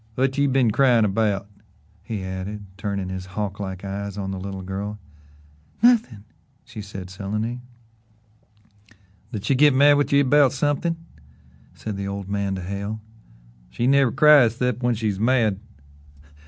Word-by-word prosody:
"Whut 135 +1 +1
you 140 0 +3
been 130 -4 +3
cryin' 120 -2 +4
about?" 100 -1 0 0.5
he 105 -3 -5
added, 95 +2 -6
turning 100 -2 -3
his 95 0 -6
hawk 100 -2 -3
like 95 -1 -5
eyes 100 0 -5
on 95 -1 -3
the 95 - -5
little 95 0 -6
girl. 100 +3 -5 0.9
"Nothin'," 225 - +3 0.4
she 110 - -9
said 95 -2 -8
sullenly. 105 +5 -4 1.7
"Did 105 -4 -5
she 140 - +2
git 145 +1 +5
mad 145 +2 +6
with 145 - 0
ye 140 0 +5
'bout 140 -1 +4
somethin'?" 155 +4 -1 0.7
said 105 -3 -6
the 100 0 -4
old 100 -1 -5
man 100 -1 -2
to 95 - -6
Hale. 100 +3 -4 0.7
"She 90 - -2
never 135 -1 +4
cries 145 -7 +6
'cept 125 -1 -1
when 120 -1 +1
she's 105 -3 -2
mad." 110 -4 +2
105 Hz, 150 wpm, -23 LUFS, 100-130 Hz, 1.7 s, mad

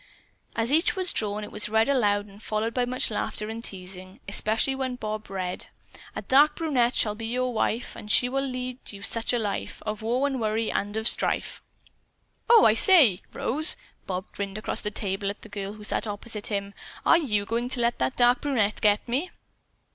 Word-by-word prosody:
As 230 +2 0
each 360 +8 +3
was 370 -1 +1
drawn, 210 -1 -1
it - - -8
was 210 - -2
read 220 +1 +2
aloud 205 -7 +1
and 200 - -16
was 210 - -17
followed 220 +2 -2
by 250 -1 0
much 250 -1 +1
laughter 210 0 -3
and 225 +1 -6
teasing, 185 -1 -8
especially 220 +6 +3
when 260 -1 -3
Bob 215 -3 -6
read: 185 -2 -2 0.5
"A - - -5
dark 295 +3 +4
brunette 260 -7 +1
shall 210 - +3
be 225 +1 -6
your 250 +1 -1
wife, 230 +1 -2
And 210 - -10
she 245 - +5
will 270 +2 -1
lead 255 -1 -5
you 200 -1 -10
such 230 +2 +2
a 245 - +1
life 210 -3 -4
Of 215 0 -4
woe 245 +5 0
and 270 -3 -2
worry 220 +1 -1
and 205 +2 -2
of 220 +1 0
strife." - - -1 0.9
"Oh, 465 -2 +7
I 215 - +6
say, 250 - +7
Rose," 310 +7 +2 0.3
Bob 185 0 -3
grinned 200 0 -5
across 215 - 0
the 210 - -2
table 200 -1 -3
at 200 - -8
the 225 - -12
girl 200 -1 -5
who 210 0 -12
sat 215 - 0
opposite 210 +1 -3
him, 200 -1 -3 0.3
"are 335 - +6
you 210 -10 -1
going 235 +3 -2
to 255 - +3
let 235 0 0
that 130 0 -1
dark 245 0 +4
brunette 225 -8 0
get 210 +1 +2
me?" 275 +10 -1
220 Hz, 205 wpm, -26 LUFS, 205-250 Hz, 0.9 s, Oh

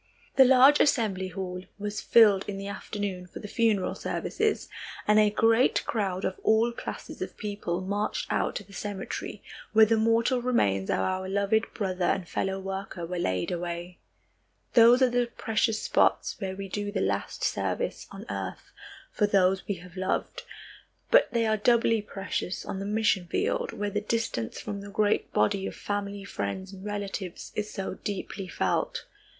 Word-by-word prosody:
The 265 - +8
large 265 +3 +7
assembly 210 -9 +2
hall 180 0 -5 0.2
was 210 0 -4
filled 210 -4 +6
in 200 - -4
the 195 - -6
afternoon 200 -2 -4
for - - -11
the - - -7
funeral 215 -4 +1
services, 435 -1 -1 0.4
and 210 0 +6
a 210 -1 +5
great 225 +4 +3
crowd 195 -4 -1
of 185 - -3
all 225 +2 +3
classes 235 - -7
of - - -5
people 200 -4 -3
marched 205 +3 -2
out - - 0
to - - -4
the 200 +1 -17
cemetery, 200 -1 -5 0.3
where 220 0 +8
the 225 +1 +2
mortal 230 +3 +2
remains 100 - +1
of - - +2
our 185 - -1
loved 200 +3 +1
brother 185 -3 -1
and 175 0 0
fellow 190 +2 -2
worker 195 -2 -5
were 180 +1 -4
laid 95 - -1
away. 175 0 -4 0.7
Those 240 +2 +7
are 245 -1 +2
precious 225 -1 0
spots - - +2
where 190 -1 -3
we 195 0 -6
do 205 +2 -3
the - - -1
last - - -2
service - - -1
on - - -9
earth - - -5 0.4
for 210 - +2
those 190 -1 +2
we 200 - -1
have 180 0 -13
loved, 185 0 -2 0.7
but - - +6
they 235 -1 +1
are 220 0 +2
doubly 230 0 +3
precious 195 -2 -4
on 190 - -4
the 200 - -4
mission 205 -4 +1
field 485 - -1
where 205 0 -3
the 210 +1 -1
distance 215 - -2
from 205 -1 -5
the 205 - -9
great 205 +1 +1
body 200 -1 +1
of - - -6
family 205 -1 -3
friends 190 - -4
and 190 0 -10
relatives 200 -3 -5
is 210 0 -3
so 195 -3 -4
deeply 195 -1 -4
felt. - - -1
205 Hz, 170 wpm, -28 LUFS, 190-220 Hz, 0.7 s, The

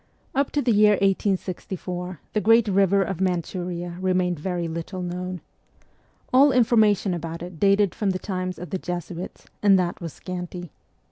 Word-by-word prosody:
Up 275 +1 +1
to 290 - +1
the 240 - +2
year 210 0 +6
1864 185 -2 -2
the 215 - +1
great 225 +2 +5
river 195 0 +3
of 190 -2 -4
Manchuria 175 -1 -2
remained 180 -3 +1
very 175 0 -2
little 170 +3 -5
known. 180 0 -4 0.9
All 275 +3 +7
information 220 -6 +3
about 165 0 -5
it 175 -2 -9
dated 200 -1 +3
from 205 - -1
the 185 - 0
times 185 -2 -4
of 180 - -8
the 190 - -2
Jesuits, 175 0 -6 0.2
and 200 -2 +6
that 180 -1 -1
was 165 -2 -5
scanty. 180 -2 -7
185 Hz, 155 wpm, -24 LUFS, 175-200 Hz, 0.9 s, All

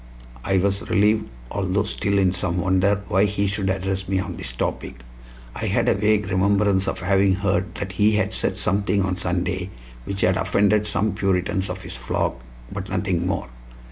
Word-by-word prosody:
I 95 0 +1
was 100 +1 0
relieved, 105 -4 +2 0.2
although 100 0 0
still 100 -1 -1
in 95 -2 +3
some 90 -1 -1
wonder 95 +2 +2
why 95 +3 +3
he 100 0 0
should 100 -1 0
address 95 0 -2
me 95 +1 0
on 95 - -4
this 60 - -4
topic. - - -4 0.5
I - - -3
had - - +1
a - - +5
vague 105 -1 +1
remembrance 100 0 +2
of - - -2
having 95 +1 +3
heard 95 -1 -1
that 100 -1 -4
he 105 +3 +3
had 105 - 0
said - - 0
something 100 0 +1
on 95 -1 -1
Sunday 90 +1 -2 0.4
which 100 0 -4
had 90 0 +3
offended 105 +2 +2
some 105 0 0
Puritans 95 -1 0
of - - -5
his - - -6
flock, - - -2 0.3
but 100 -1 -5
nothing 90 -2 -1
more. - - -2
95 Hz, 180 wpm, -23 LUFS, 95-100 Hz, 0.5 s, a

